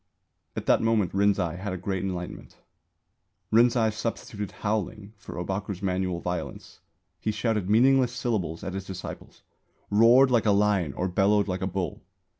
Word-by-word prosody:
At - - -4
that - - +4
moment 115 -4 +1
Rinzai 95 -4 +1
had 100 0 -4
a - - -3
Great 95 0 -3
Enlightenment. 90 -2 -6 1.0
Rinzai 115 -1 +4
substituted 105 -2 -4 0.2
howling 105 0 -2
for 105 - -10
Ōbaku's 95 +2 -4
manual 90 -2 -1
violence. 90 0 -5 0.4
He - - -2
shouted 110 -3 -1
meaningless 125 +3 +4
syllables 110 -10 -2
at 95 - -4
his 95 0 -5
disciples; 95 -1 -8 0.5
roared 120 +5 +6
like 115 -3 +3
a - - +5
lion 100 -8 +1
or 90 - -2
bellowed 100 +2 +2
like 95 -1 -3
a 95 - 0
bull. 95 -1 -3
100 Hz, 150 wpm, -26 LUFS, 95-110 Hz, 1.0 s, roared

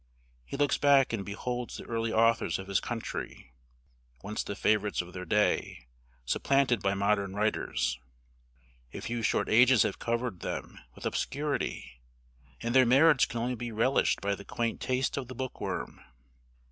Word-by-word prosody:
He 140 - -7
looks 145 0 +2
back 140 -3 +4
and 105 -4 -2
beholds 120 +5 -4
the - - -8
early 115 -1 -2
authors 115 -7 +2
of 95 - -7
his 100 -1 +1
country, 115 - -6 0.7
once 105 +2 -3
the 100 - -5
favorites 105 0 +1
of 90 0 -13
their 90 0 -6
day, 95 -11 0 0.4
supplanted 130 - +2
by 100 0 +1
modern 100 -1 0
writers. 65 - -1 1.0
A - - -4
few 120 0 -3
short 110 - +1
ages 125 0 +6
have - - -2
covered 115 -4 -2
them - - -5 0.2
with - - -10
obscurity, 140 - -3 0.6
and 120 0 -1
their 130 0 +7
merits 135 +4 +5
can 115 - -4
only 125 +2 -1
be 120 0 -5
relished 115 +5 +2
by 100 0 0
the 100 - -7
quaint 115 +2 -3
taste 130 +1 0
of 135 -3 -3
the 130 - -8
bookworm. 130 +1 -5
115 Hz, 160 wpm, -29 LUFS, 100-125 Hz, 1.0 s, their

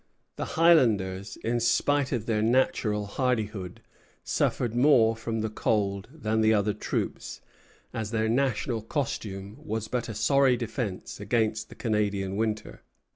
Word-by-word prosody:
The - - -5
Highlanders, 110 - +3
in 120 +1 0
spite 135 +4 +2
of 115 -4 -1
their 110 -2 0
natural 110 -3 +1
hardihood, 105 -5 -2 0.4
suffered 120 -3 0
more 120 -3 +5
from 115 0 -3
the 110 - -1
cold 100 -2 -1
than 110 -8 -1
the 110 0 +4
other 105 0 +1
troops, 105 - -4 0.5
as 110 -2 -3
their 110 0 0
national 120 -1 0
costume 105 -5 -4
was 110 0 -3
but 120 +1 -2
a 110 - -5
sorry 130 +4 +3
defence 115 -4 -4
against 110 +1 0
the - - -12
Canadian 100 -4 -1
winter. 110 0 -2
110 Hz, 135 wpm, -27 LUFS, 105-120 Hz, 0.5 s, more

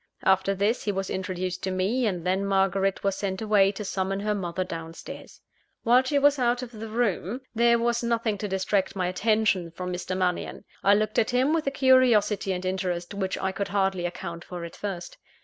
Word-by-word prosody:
After 190 +1 +3
this, 205 +5 0
he 210 - +1
was 195 -1 -3
introduced 185 -1 -3
to 190 - -2
me; 200 +7 0
and 180 -4 -3
then 190 +2 +1
Margaret 195 0 +1
was 195 -1 +1
sent 195 -1 -3
away 210 -3 +4
to 210 +1 -6
summon 195 +1 -2
her 210 +1 0
mother 185 -2 -2
down 165 -2 -7
stairs. - - -10 0.4
While 245 +2 +5
she 265 +3 0
was 285 0 +4
out 245 0 +1
of 245 - -8
the 225 -1 -7
room, 225 0 -1
there 235 +1 +4
was 235 0 0
nothing 230 -3 0
to 210 - -2
distract 190 0 0
my 185 -2 0
attention 200 -1 +1
from 180 +2 -5
Mr. 180 +1 -3
Mannion. 185 +2 -2 0.2
I 200 +1 +6
looked 215 +1 +1
at 220 - +2
him 255 +4 +2
with 320 -3 0
a - - +2
curiosity 245 -7 +4
and 185 0 -3
interest, 180 -1 -2
Which 190 -2 -2
I 190 - -1
could 200 +1 -3
hardly 190 -3 0
account 170 -1 -7
for 175 -2 -7
at 170 - -10
first. 190 -4 -6
195 Hz, 205 wpm, -26 LUFS, 185-225 Hz, 0.4 s, I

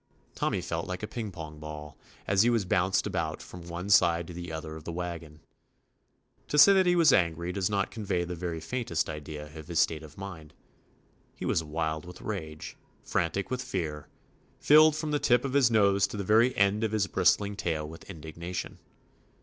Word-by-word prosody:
Tommy - - -1
felt 85 -1 -3
like 90 +2 -5
a - - -2
ping 110 -3 -5
pong 80 -3 -9
ball, 75 -1 -8 0.3
as 100 0 +3
he 120 - +4
was 115 -5 +1
bounced 95 0 +1
about - - -2
from 90 - -10
one 85 +2 -5
side 85 -6 +4
to 90 - -9
the 85 0 -7
other 80 0 -6
of 80 - -9
the 85 - -5
wagon. 85 -3 -6 1.1
To 150 - -1
say 200 +7 +9
that 190 -2 +4
he 175 - +4
was 170 -3 +6
angry 85 -1 +1
does 95 0 -1
not 100 -1 0
con 110 - -6
vey 90 -3 0
the 90 +1 -5
very 85 -1 -4
faintest 85 -1 -2
idea 75 0 -8
of 80 -1 -9
his 85 -2 -1
state 80 -1 +2
of 75 -2 -13
mind: 90 -6 -9 0.8
he - - -6
was 80 - +1
wild 80 0 -3
with 90 0 -10
rage, 80 -7 -6 0.3
fran 85 - 0
tic 100 +6 -4
with 130 0 -1
fear, 75 - -4 0.5
filled 155 +1 +6
from 155 -1 -3
the 145 - +1
tip 125 -1 +3
of 135 - -3
his 140 -4 +5
nose 100 -3 +3
to - - -7
the 100 - -2
very 115 +6 +3
end 100 +2 +3
of 110 -1 -1
his 105 -2 +2
bristling 100 +1 +2
tail 80 -6 -2
with 80 +4 -12
indignation. 85 +1 -6
90 Hz, 205 wpm, -29 LUFS, 80-105 Hz, 1.1 s, say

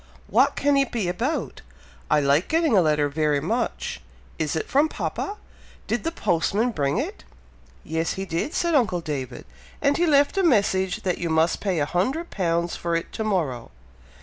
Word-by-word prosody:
"What - - +3
can 285 0 +2
it 275 -2 +1
be 220 -6 -1
about! 235 - -2 0.5
I 150 - +4
like 140 +4 +2
getting 320 -6 +2
a 190 - +6
letter 150 -2 +2
very 150 0 +1
much! 225 +11 -2 0.4
Is 155 -1 -1
it 160 - -2
from 290 +3 +3
papa? 410 +5 -4 0.5
Did - - -2
the 330 - -1
postman 205 - 0
bring 140 -8 0
it?" - - -4 0.6
"Yes, 160 +1 -1
he 195 - -4
did," 180 - -3
said 340 -1 +1
uncle 210 - +2
David: 135 -6 -5 0.3
"and 280 +1 +2
he 350 0 +2
left 290 +5 +3
a - - +2
message 200 - +2
that 180 -2 -1
you 170 - -2
must 160 +1 +2
pay 190 -4 -1
a 145 - +1
hundred 260 - -1
pounds 170 -2 0
for 170 -1 -2
it 165 - -3
to 220 - -3
morrow." 160 - -1
185 Hz, 180 wpm, -24 LUFS, 160-265 Hz, 0.6 s, a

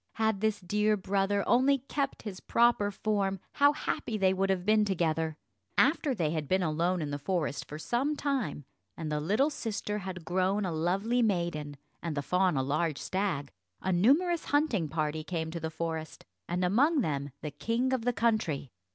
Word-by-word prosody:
Had 220 -3 0
this 220 -1 +1
dear 210 +3 +1
brother 200 +1 0
only 265 +3 +4
kept 275 +1 -3
his 195 -4 -6
own - - -28
proper 235 -3 +4
form, 200 -2 -1
how 285 0 +5
happy 230 -6 -2
they 190 -2 +3
would 195 +1 0
have 185 -2 0
been 215 0 +4
together! 165 -5 0 0.4
After 285 -1 +3
they 160 -7 0
had 155 -3 -2
been 185 +3 +2
alone 170 +2 0
in 145 - -4
the 145 - -3
forest 155 -2 -1
for 150 - -7
some 255 - 0
time, 255 - -2 0.3
and 155 -2 -4
the 150 - 0
little 210 - +2
sister 210 -5 -3
had 185 -3 -6
grown 190 +3 +1
a 180 - -1
lovely 195 +9 +1
maiden, 170 -9 -1 0.2
and 165 -3 -3
the 145 - -1
fawn 180 -1 +2
a 130 - +1
large 150 +2 0
stag, 185 -8 -2 0.3
a 190 - -1
numerous 310 - +3
hunting 285 - +1
party 155 0 -1
came 160 -1 -3
to 170 - -4
the 160 0 -3
forest, 160 -1 -5 0.2
and 180 +1 0
amongst 270 - +3
them 140 -3 -2
the 150 - -3
king 230 - -1
of 255 -3 0
the 245 - +2
country. 215 - 0
190 Hz, 185 wpm, -30 LUFS, 160-225 Hz, 0.4 s, how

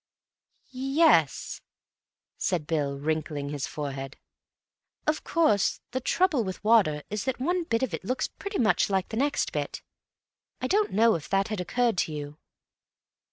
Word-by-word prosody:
"Y 255 - -8
yes," 270 - +3 0.7
said 175 -5 -1
Bill, 145 -3 -1
wrinkling 150 -1 -2
his 145 -2 -3
forehead. 135 -2 -5 0.9
"Of 305 0 0
course, 310 - +2
the 260 - -1
trouble 325 -2 +2
with 190 0 -6
water 200 -10 +4
is 210 -1 -2
that 260 -1 -1
one 350 +6 0
bit 230 -4 0
of 240 -9 -1
it 160 - -4
looks 255 +7 -1
pretty 400 0 -6
much 220 -3 +3
like 190 -2 0
the 220 - -4
next 285 +3 +1
bit. - - -4 0.8
I - - -3
don't 415 +2 +2
know 225 +3 +4
if 145 -5 -4
that 195 +1 +1
had 215 -4 -2
occurred 235 +2 +1
to 155 - 0
you. 150 0 -6
200 Hz, 160 wpm, -27 LUFS, -, 0.9 s, water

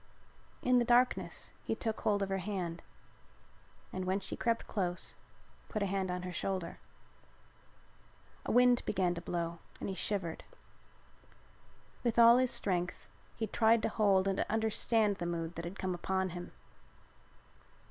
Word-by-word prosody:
In 250 0 +5
the - - +3
darkness 245 +1 +2
he - - -1
took 220 -1 -3
hold 205 -1 +2
of 195 - -3
her 195 0 0
hand 180 -3 -3 1.1
and 185 0 -3
when 190 +2 +1
she 190 - -6
crept 230 -1 0
close 180 -4 -2 0.6
put 215 -3 -1
a - - +2
hand 190 -1 -1
on 180 0 -3
her 180 - -4
shoulder. 185 -1 -3 1.7
A - - 0
wind 245 0 +5
began 185 -3 +1
to 170 - -5
blow 170 -1 -3 0.2
and - - -4
he - - -2
shivered. 185 -3 -2 1.6
With 235 -2 0
all 235 +1 +9
his 255 -1 +3
strength 180 -5 -1 0.3
he 225 - -1
tried 225 +1 +3
to - - +2
hold 195 -3 +3
and 195 0 +1
to - - -1
understand 220 -1 +2
the 175 - -3
mood 170 -1 -3
that 170 0 -6
had 175 +3 -6
come 185 -1 -1
upon 190 +2 -1
him. 175 0 -7
195 Hz, 155 wpm, -33 LUFS, 180-220 Hz, 1.7 s, all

